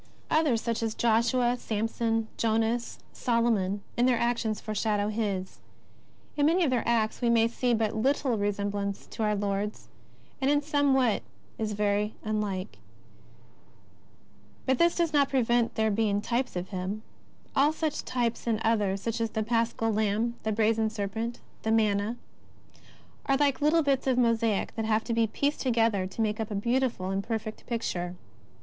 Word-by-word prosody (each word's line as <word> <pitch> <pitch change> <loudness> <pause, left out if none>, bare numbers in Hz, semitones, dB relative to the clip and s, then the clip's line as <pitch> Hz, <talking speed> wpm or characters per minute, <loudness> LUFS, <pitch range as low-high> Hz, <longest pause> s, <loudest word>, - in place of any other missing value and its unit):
Others, 295 -8 +3
such 230 -1 -1
as 225 -1 -2
Josue, 240 +2 +2
Samson, 225 +1 -1
Jonas, 225 +1 0 0.2
Solomon, 225 -5 +1
in 245 +1 +3
their 250 -2 +3
actions 235 -3 0
foreshadow 210 -1 -1
His. 200 -4 -3 0.8
In 290 0 +3
many 350 +3 +3
of 290 - +2
their 245 -2 +2
acts 225 -1 +1
we 240 - +2
may 230 -1 +4
see 240 +1 0
but 220 -1 0
little 260 +2 +1
resemblance 205 -1 -2
to - - -8
our 210 -1 +2
Lord's, 205 +1 -3 0.5
and 265 - +2
in 290 0 +3
some 285 -2 +2
what 250 -5 +2 0.4
is 215 -1 -1
very 210 +1 0
unlike. 210 -3 -3 1.9
But 260 -1 +1
this 340 0 +4
does 335 -3 0
not 285 -2 +4
prevent 240 -3 +2
their 220 -1 +2
being 205 -1 +1
types 235 +3 -1
of 180 +1 -4
Him. 195 +3 -4 0.5
All 285 +3 +4
such 315 -1 -2
types, 240 -2 -2
and 225 -2 +1
others, 205 -4 +1
such 230 0 -2
as 225 - 0
the 220 0 -2
Paschal 230 0 0
Lamb, 215 +2 +1
the 220 - -1
Brazen 220 +1 +2
Serpent, 220 +3 -4 0.2
the 220 - -2
Manna, 215 0 +2 1.1
are 275 - +3
like 285 0 +1
little 310 +2 +4
bits 275 -2 +1
of 255 -2 +2
mosaic 230 -4 +1
that 225 -1 -2
have 220 0 +1
to 235 - -2
be 230 -1 +2
pieced 285 +7 -1
together 225 -6 +2
to 190 +4 -5
make 215 0 -1
up 220 - -2
a 210 - -3
beautiful 235 -3 0
and 195 +1 -1
perfect 220 -1 -5
picture. 180 -7 -3
225 Hz, 165 wpm, -28 LUFS, 210-245 Hz, 1.9 s, may